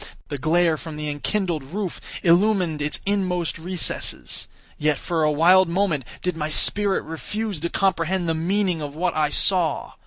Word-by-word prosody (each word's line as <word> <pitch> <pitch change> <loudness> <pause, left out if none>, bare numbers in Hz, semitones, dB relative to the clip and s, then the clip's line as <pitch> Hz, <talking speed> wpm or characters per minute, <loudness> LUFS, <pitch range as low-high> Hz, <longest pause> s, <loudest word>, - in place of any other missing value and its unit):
The 145 - -4
glare 165 +2 +2
from 160 0 -8
the 150 0 -4
enkindled 155 +3 -2
roof 185 +6 -5 0.2
illumined 180 -3 +3
its 150 +1 -2
inmost 185 -5 -1
recesses. 175 +1 0 0.3
Yet, 150 -1 +1
for 165 +2 -2
a 155 -1 +3
wild 175 +4 +5
moment, 170 -7 0 0.2
did 180 -2 -1
my 155 -1 -3
spirit 200 +5 +2
refuse 200 +4 -4
to 170 +3 -2
comprehend 185 -1 0
the 165 - +1
meaning 180 +1 0
of 145 -1 -6
what 180 +3 -1
I 155 -1 +2
saw. 180 0 +1
170 Hz, 160 wpm, -23 LUFS, 155-190 Hz, 0.3 s, wild